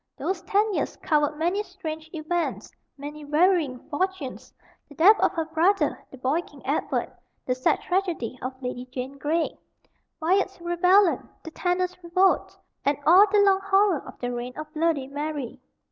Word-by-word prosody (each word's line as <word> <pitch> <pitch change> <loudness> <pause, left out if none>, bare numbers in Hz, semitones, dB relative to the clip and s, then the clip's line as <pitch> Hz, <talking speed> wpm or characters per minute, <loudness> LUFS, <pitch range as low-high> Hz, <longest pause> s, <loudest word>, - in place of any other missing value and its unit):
Those 375 -2 -2
ten 405 +3 +1
years - - -2
covered 300 -1 +1
many 350 +6 0
strange 320 -5 -7
events, 335 +1 -3 0.3
many 295 +2 -8
varying 305 -2 +2
fortunes 355 -3 -3 0.4
the 290 - -14
death 400 +8 +6
of - - +3
her 325 -1 -1
brother, 335 +5 +1
the 265 - -12
boy 265 +6 0
King - - -16
Edward, - - -1 0.3
the 250 - +1
sad 255 0 +1
tragedy 355 - -1
of 260 0 -5
Lady 250 0 -4
Jane 260 +2 -6
Grey, 320 +4 0 0.6
Wyatt's 380 +4 +1
rebellion, 350 +2 +3
the 320 - -8
tanner's 360 +1 -1
revolt, 370 +3 +2 0.3
and 285 0 +1
all 370 +7 +8
the 415 -1 +5
long 390 -1 +4
horror 395 -4 +3
of - - -11
the 245 0 -3
reign 245 +1 -5
of 310 0 -7
"Bloody 315 -3 +1
Mary." 285 -2 -5
325 Hz, 160 wpm, -25 LUFS, 290-370 Hz, 0.6 s, all